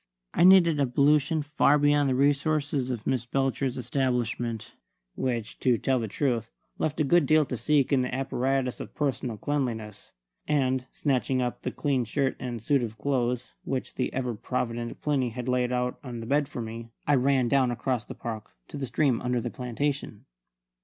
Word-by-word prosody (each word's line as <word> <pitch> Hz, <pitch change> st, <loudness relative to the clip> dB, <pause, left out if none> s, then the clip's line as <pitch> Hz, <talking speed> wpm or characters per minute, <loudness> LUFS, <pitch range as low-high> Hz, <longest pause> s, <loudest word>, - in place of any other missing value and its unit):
I -, -, +3 dB
needed 175 Hz, -4 st, +7 dB
ablution 145 Hz, +4 st, +3 dB
far 150 Hz, 0 st, +3 dB
beyond 145 Hz, -1 st, +3 dB
the 130 Hz, -, +1 dB
resources 140 Hz, -1 st, +1 dB
of 120 Hz, -4 st, -4 dB
Miss 125 Hz, -3 st, -1 dB
Belcher's 135 Hz, 0 st, 0 dB
establishment, 120 Hz, -3 st, -2 dB, 0.4 s
which, 120 Hz, -4 st, -3 dB
to 125 Hz, -2 st, +3 dB
tell 130 Hz, +3 st, +1 dB
the 115 Hz, -, -2 dB
truth, 115 Hz, 0 st, -1 dB, 0.3 s
left 155 Hz, 0 st, -1 dB
a -, -, +4 dB
good 160 Hz, +1 st, +3 dB
deal 155 Hz, 0 st, +5 dB
to 130 Hz, -, -4 dB
seek 145 Hz, +2 st, +2 dB
in 135 Hz, -, +4 dB
the 125 Hz, -, -2 dB
apparatus 130 Hz, 0 st, -1 dB
of -, -, -8 dB
personal 130 Hz, -5 st, -1 dB
cleanliness; 115 Hz, -7 st, -3 dB, 0.4 s
and, 130 Hz, -3 st, +1 dB
snatching 130 Hz, -2 st, 0 dB
up 125 Hz, -1 st, -2 dB
the -, -, -2 dB
clean 135 Hz, -4 st, 0 dB
shirt 135 Hz, +4 st, 0 dB
and 120 Hz, -3 st, -5 dB
suit 140 Hz, +2 st, +2 dB
of 115 Hz, -2 st, -4 dB
clothes 125 Hz, 0 st, -1 dB
which 130 Hz, -2 st, -3 dB
the 125 Hz, -, -2 dB
ever 125 Hz, -2 st, -2 dB
provident 120 Hz, +1 st, -3 dB
Plinny 140 Hz, -4 st, +1 dB
had 125 Hz, +1 st, -6 dB
laid 125 Hz, -1 st, +1 dB
out 125 Hz, 0 st, -1 dB
on 120 Hz, -3 st, -6 dB
the 115 Hz, -, -6 dB
bed 145 Hz, +3 st, +1 dB
for 120 Hz, -5 st, -5 dB
me, 115 Hz, +1 st, -7 dB, 0.2 s
I 145 Hz, -, +3 dB
ran 130 Hz, -1 st, +3 dB
down 130 Hz, 0 st, +3 dB
across 120 Hz, 0 st, -1 dB
the -, -, -9 dB
park 110 Hz, -2 st, -7 dB
to -, -, -7 dB
the 135 Hz, -2 st, -3 dB
stream 120 Hz, 0 st, +1 dB
under 125 Hz, 0 st, 0 dB
the 120 Hz, 0 st, -4 dB
plantation. 125 Hz, -2 st, -3 dB
130 Hz, 180 wpm, -27 LUFS, 120-140 Hz, 0.4 s, needed